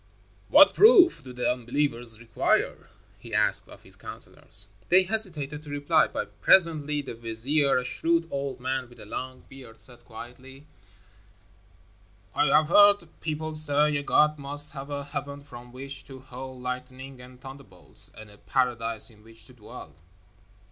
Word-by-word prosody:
"What - - +7
proof 395 - +6
do 130 - -11
the 125 0 -1
unbelievers 120 -2 0
require?" 115 -2 -1 0.3
he - - -8
asked - - +3
of - - -15
his - - -13
counselors. 100 - -3 0.2
They 185 +2 +5
hesitated 165 -8 0
to 150 - -13
reply, 145 +2 +1
but - - -7
presently 150 -5 +3
the 130 - -8
vizier, 120 +6 0
a 125 - -2
shrewd 165 +4 -1
old 140 -2 -4
man 130 0 -4
with 120 - -18
a - - -12
long 130 +4 -7
beard, 125 -4 -14
said 120 -2 -1
quietly, 130 +4 -13 1.7
"I 150 - +1
have 150 +3 +3
heard 205 -3 +5
people 155 0 -4
say 150 -1 +2
a 145 - -1
god 150 +1 +2
must 145 +1 +2
have 140 0 -8
a 140 0 -5
heaven 140 0 -7
from 125 -3 -13
which 135 +2 -9
to 135 -1 -12
hurl 130 0 -10
lightning 130 +1 -8
and 125 0 -15
thunderbolts, 135 -10 -9
and 110 -1 -12
a 105 - -19
paradise 120 -3 -1
in 105 -1 -21
which 115 0 -13
to 130 - -17
dwell." 110 -4 -13
135 Hz, 155 wpm, -26 LUFS, 125-150 Hz, 1.7 s, What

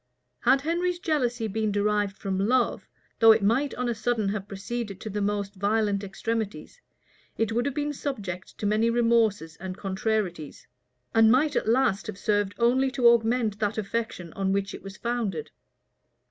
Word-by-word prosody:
Had 265 +3 +3
Henry's 345 +4 0
jealousy 250 -9 0
been 215 +1 -1
derived 205 -1 0
from 190 -2 -2
love, 240 +5 +1 0.3
though 225 -1 +8
it 220 -1 +3
might 255 +8 +1
on 250 0 -2
a 240 - +1
sudden 220 -2 0
have 200 -1 -3
proceeded 205 0 -5
to 215 - -5
the 205 +1 -2
most 200 0 -1
violent 205 0 0
extremities, 220 - -4 0.6
it 225 -1 0
would 240 +4 0
have 280 - -3
been 295 0 -1
subject 200 -11 -5
to - - -4
many 215 +3 +2
remorses 230 -8 +2
and 185 0 -6
contrarieties; 190 -5 -2 0.5
and 225 0 +6
might 290 +4 +3
at - - 0
last 230 -5 +2
have 215 -3 -6
served 205 -1 0
only 255 +3 +3
to 255 -2 +3
augment 225 -2 +2
that 210 0 -1
affection 210 -5 -3
on 195 -1 -1
which 195 0 -1
it - - -8
was 195 -1 -9
founded. 230 -9 -3
220 Hz, 170 wpm, -26 LUFS, 200-240 Hz, 0.6 s, though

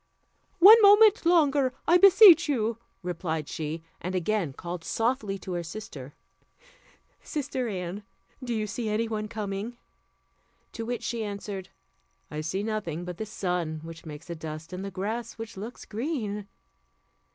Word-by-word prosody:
"One 420 +5 +9
moment 415 -2 +6
longer, 285 -6 +3
I 350 +2 +6
beseech 385 -4 +8
you," 230 -4 0 0.2
replied 165 -3 -3
she, 160 +1 -5 0.2
and 180 +2 -3
again 185 -3 0
called 170 +4 -7
softly 225 -1 -1
to 185 -1 -7
her 175 - -2
sister, 160 -7 -9 1.1
"Sister 275 -4 -3
Anne, 185 -1 -4 0.4
do 245 - -4
you 215 -1 -1
see 220 +2 -4
any 220 +2 0
one 215 -1 -3
coming?" 210 +2 -5 0.9
To 225 0 -6
which 245 -1 -3
she 230 -2 -2
answered, 200 -2 -6 0.6
"I 150 0 -4
see 185 +6 -2
nothing 190 -7 -3
but 180 -1 -6
the 220 - -5
sun, 180 -6 -2
which 165 0 -10
makes 155 0 -10
a 170 - -5
dust, 155 +1 -8
and 185 +1 -5
the 200 - -4
grass, 215 +5 -4
which 225 0 -8
looks 215 +5 -8
green." 215 -5 -3
210 Hz, 150 wpm, -27 LUFS, 175-240 Hz, 1.1 s, One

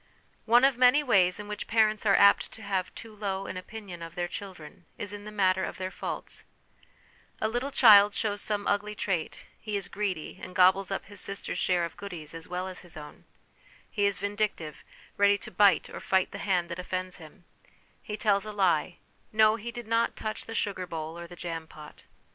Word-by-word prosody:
One 240 +3 +6
of 270 -3 +2
many 255 +4 +6
ways 190 -8 +3
in 210 - -7
which 210 0 -5
parents 215 -1 +2
are 195 - +6
apt 200 0 +5
to 220 - -11
have 190 -2 -2
too 225 -1 -9
low 195 -2 -3
an - - -6
opinion 185 -2 -8
of 165 0 -8
their 175 0 -1
children 175 -3 -9
is 205 0 -5
in 205 0 -8
the 215 - -7
matter 190 -2 +2
of - - -4
their 185 0 -4
faults, - - -6 1.0
A 220 - +1
little 245 +5 -2
child 210 -6 +7
shows 205 -2 -1
some 205 -1 -2
ugly 210 +1 0
trait 185 -6 -3
he 215 -1 -4
is 195 - -3
greedy, 190 -4 -4
and 180 - -9
gobbles 185 +1 +5
up 195 - -3
his 205 -2 -6
sister's 200 +1 -2
share 180 -2 +2
of 170 - -9
goodies 170 -6 -7
as 165 0 -8
well 180 +1 -3
as 185 -1 -6
his 175 -3 -10
own; 150 -1 -11 0.7
he 205 -1 +2
is 200 -1 0
vindictive, 205 -7 -3 0.3
ready 200 0 +5
to - - -9
bite 195 -1 +4
or - - -8
fight 190 -1 +1
the 200 - -7
hand 180 -4 0
that 170 0 -5
offends 185 0 -3
him; 170 +2 -15 0.6
he 210 - -6
tells 205 -2 +2
a - - -4
lie; 185 -4 +1 0.3
no, 215 0 +5
he 230 +1 -6
did 240 0 -7
not 230 +1 +1
touch 215 0 -5
the 225 - -6
sugar 195 -4 -2
bowl 160 -1 -5
or 170 0 -8
the 175 - -11
jam 165 -2 -5
pot. 150 -1 -13
200 Hz, 205 wpm, -28 LUFS, 180-210 Hz, 1.0 s, child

